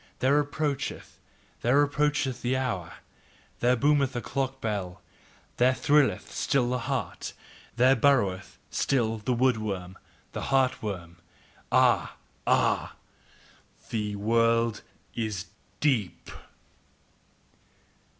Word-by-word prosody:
There 140 Hz, +3 st, +3 dB
approacheth, 145 Hz, -1 st, -3 dB, 0.4 s
there 125 Hz, +4 st, +3 dB
approacheth, 145 Hz, -2 st, 0 dB
the 125 Hz, +2 st, 0 dB
hour, 100 Hz, -10 st, -2 dB, 0.7 s
There 125 Hz, +1 st, +3 dB
boometh 140 Hz, 0 st, +2 dB
the 120 Hz, -, -3 dB
clock 135 Hz, 0 st, -3 dB
bell, 100 Hz, -6 st, -3 dB, 0.6 s
there 130 Hz, +1 st, +4 dB
thrilleth 145 Hz, 0 st, +2 dB
still 125 Hz, -4 st, +1 dB
the 125 Hz, -, 0 dB
heart, 125 Hz, -, -3 dB, 0.4 s
there 130 Hz, +3 st, +5 dB
burroweth 115 Hz, -8 st, +1 dB
still 115 Hz, -4 st, 0 dB
the 115 Hz, +5 st, -1 dB
wood 125 Hz, -1 st, +3 dB
worm, 95 Hz, -4 st, -5 dB, 0.3 s
the -, -, -5 dB
heart 130 Hz, -1 st, +2 dB
worm. 90 Hz, -6 st, -6 dB, 0.5 s
Ah! -, -, +3 dB, 0.3 s
Ah! -, -, +2 dB, 1.0 s
THE 105 Hz, -2 st, -2 dB
WORLD 115 Hz, +1 st, +2 dB, 0.3 s
IS 110 Hz, -6 st, -3 dB, 0.4 s
DEEP! 125 Hz, -11 st, 0 dB
125 Hz, 100 wpm, -27 LUFS, 105-135 Hz, 1.0 s, there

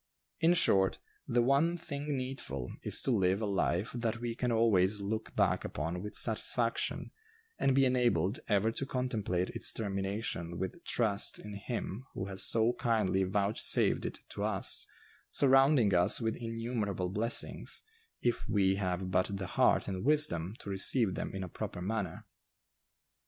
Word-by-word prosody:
In 170 Hz, +2 st, +4 dB
short, 95 Hz, -, +3 dB, 0.3 s
'the 120 Hz, 0 st, +2 dB
one 145 Hz, +7 st, +3 dB
thing 150 Hz, -4 st, -4 dB
needful' 125 Hz, -, -5 dB
is -, -, +3 dB
to 135 Hz, -, +1 dB
live 95 Hz, -3 st, +2 dB
a 110 Hz, -, -1 dB
life 100 Hz, 0 st, 0 dB
that 115 Hz, -2 st, -2 dB
we 120 Hz, -1 st, -3 dB
can 125 Hz, +1 st, -1 dB
always 105 Hz, -3 st, +3 dB
look 110 Hz, +2 st, -4 dB
back -, -, +2 dB
upon 85 Hz, +5 st, -3 dB
with 105 Hz, +1 st, -6 dB
satisfaction, 115 Hz, +1 st, -1 dB, 0.5 s
and 135 Hz, -, +3 dB
be 135 Hz, 0 st, +5 dB
enabled 120 Hz, -6 st, +2 dB
ever 105 Hz, +1 st, +3 dB
to 135 Hz, -, -3 dB
contemplate 110 Hz, -9 st, -1 dB
its -, -, -1 dB
termination 95 Hz, -4 st, -3 dB
with 95 Hz, -, -5 dB
trust 105 Hz, -4 st, 0 dB
in 105 Hz, -, -9 dB
Him 110 Hz, +2 st, -5 dB
who 95 Hz, -, -3 dB
has 95 Hz, -1 st, -2 dB
so 115 Hz, +1 st, +4 dB
kindly 110 Hz, -6 st, +1 dB
vouchsafed 100 Hz, +2 st, +1 dB
it -, -, -5 dB
to -, -, -5 dB
us, -, -, 0 dB, 0.4 s
surrounding 135 Hz, -5 st, +4 dB
us 90 Hz, 0 st, +4 dB
with 110 Hz, -2 st, -1 dB
innumerable 115 Hz, -5 st, -3 dB
blessings, 110 Hz, +5 st, -1 dB, 0.4 s
if 120 Hz, -1 st, 0 dB
we 95 Hz, -2 st, +2 dB
have 95 Hz, -1 st, -2 dB
but 90 Hz, 0 st, +2 dB
the 95 Hz, -, -4 dB
heart -, -, +3 dB
and 95 Hz, -2 st, -3 dB
wisdom 115 Hz, -, +2 dB
to -, -, -8 dB
receive 100 Hz, +2 st, +2 dB
them -, -, -4 dB
in 95 Hz, -, -3 dB
a -, -, -5 dB
proper 90 Hz, -, -6 dB
manner." 95 Hz, -2 st, -3 dB
105 Hz, 155 wpm, -32 LUFS, 95-120 Hz, 0.5 s, be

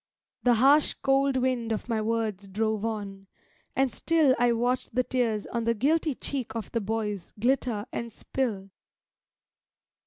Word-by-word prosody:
The 245 Hz, -1 st, +4 dB
harsh, 280 Hz, +6 st, +4 dB
cold 270 Hz, 0 st, +3 dB
wind 250 Hz, -3 st, 0 dB
of 220 Hz, -, -2 dB
my 225 Hz, -2 st, 0 dB
words 215 Hz, -3 st, -2 dB
drove 215 Hz, +1 st, -1 dB
on, 200 Hz, -3 st, -4 dB, 0.5 s
and 270 Hz, -2 st, +1 dB
still 315 Hz, -6 st, +3 dB
I 240 Hz, 0 st, +4 dB
watched 245 Hz, +1 st, -1 dB
the 255 Hz, -, +3 dB
tears 235 Hz, -5 st, 0 dB
on 235 Hz, -1 st, -3 dB
the 230 Hz, 0 st, +2 dB
guilty 300 Hz, +5 st, +1 dB
cheek 245 Hz, -5 st, -4 dB
of 225 Hz, -, -5 dB
the 230 Hz, -, -1 dB
boys 210 Hz, -3 st, -3 dB
Glitter 240 Hz, -3 st, +1 dB
and 235 Hz, 0 st, -4 dB
spill. 210 Hz, -5 st, -3 dB
230 Hz, 150 wpm, -27 LUFS, 215-260 Hz, 0.5 s, The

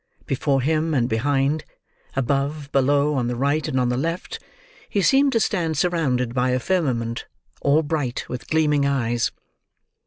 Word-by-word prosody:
Before 135 Hz, 0 st, 0 dB
him 155 Hz, +3 st, +1 dB
and 120 Hz, -3 st, +2 dB
behind: 140 Hz, +6 st, +1 dB, 0.5 s
above, 140 Hz, +2 st, -1 dB
below, 140 Hz, +2 st, +3 dB
on 125 Hz, -4 st, 0 dB
the 120 Hz, -, -2 dB
right 140 Hz, +5 st, 0 dB
and 130 Hz, -4 st, 0 dB
on 125 Hz, -1 st, +1 dB
the 125 Hz, -, 0 dB
left: 165 Hz, +6 st, -3 dB, 0.5 s
he 200 Hz, -, 0 dB
seemed 275 Hz, +4 st, +4 dB
to 230 Hz, -, +3 dB
stand 165 Hz, -8 st, 0 dB
surrounded 140 Hz, -9 st, 0 dB
by 125 Hz, 0 st, +1 dB
a 125 Hz, 0 st, +1 dB
firmament, 125 Hz, -9 st, -1 dB, 0.3 s
all 145 Hz, +3 st, +3 dB
bright 145 Hz, -5 st, -2 dB
with 125 Hz, -1 st, -6 dB
gleaming 150 Hz, -2 st, +2 dB
eyes. 120 Hz, -4 st, 0 dB
140 Hz, 155 wpm, -23 LUFS, 125-155 Hz, 0.5 s, seemed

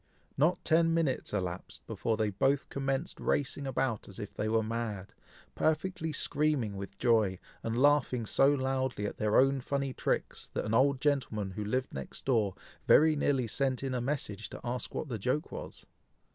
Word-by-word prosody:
Not 160 Hz, +6 st, +2 dB
ten 165 Hz, 0 st, +4 dB
minutes 155 Hz, -6 st, 0 dB
elapsed 90 Hz, -3 st, -4 dB
before 115 Hz, -1 st, -1 dB
they 110 Hz, -1 st, +1 dB
both 135 Hz, +8 st, +1 dB
commenced 135 Hz, +4 st, -2 dB
racing 140 Hz, 0 st, -1 dB
about 130 Hz, -5 st, -1 dB
as 100 Hz, -, -10 dB
if 105 Hz, -3 st, -6 dB
they 110 Hz, -, -2 dB
were 110 Hz, 0 st, +2 dB
mad, 110 Hz, -3 st, -4 dB, 0.4 s
perfectly 160 Hz, +1 st, 0 dB
screaming 145 Hz, -8 st, +1 dB
with 100 Hz, 0 st, -7 dB
joy, 110 Hz, -6 st, +3 dB, 0.2 s
and 115 Hz, +1 st, -2 dB
laughing 135 Hz, -4 st, +3 dB
so 135 Hz, +6 st, +4 dB
loudly 130 Hz, -5 st, -1 dB
at -, -, -4 dB
their 105 Hz, 0 st, +2 dB
own 135 Hz, 0 st, +4 dB
funny 140 Hz, 0 st, -2 dB
tricks, -, -, -2 dB
that -, -, -1 dB
an 105 Hz, -, -2 dB
old 135 Hz, +2 st, +3 dB
gentleman 115 Hz, -9 st, 0 dB
who 105 Hz, +2 st, -4 dB
lived 125 Hz, +5 st, -1 dB
next 70 Hz, -1 st, -7 dB
door, 110 Hz, -7 st, +2 dB, 0.3 s
very 155 Hz, +1 st, +6 dB
nearly 140 Hz, -3 st, +1 dB
sent 130 Hz, +3 st, -1 dB
in 135 Hz, -1 st, -2 dB
a 125 Hz, -, -1 dB
message 120 Hz, -6 st, -3 dB
to -, -, -9 dB
ask 120 Hz, 0 st, -4 dB
what -, -, -2 dB
the 115 Hz, -5 st, -4 dB
joke 130 Hz, +9 st, -1 dB
was. -, -, -8 dB
130 Hz, 175 wpm, -31 LUFS, 110-140 Hz, 0.4 s, very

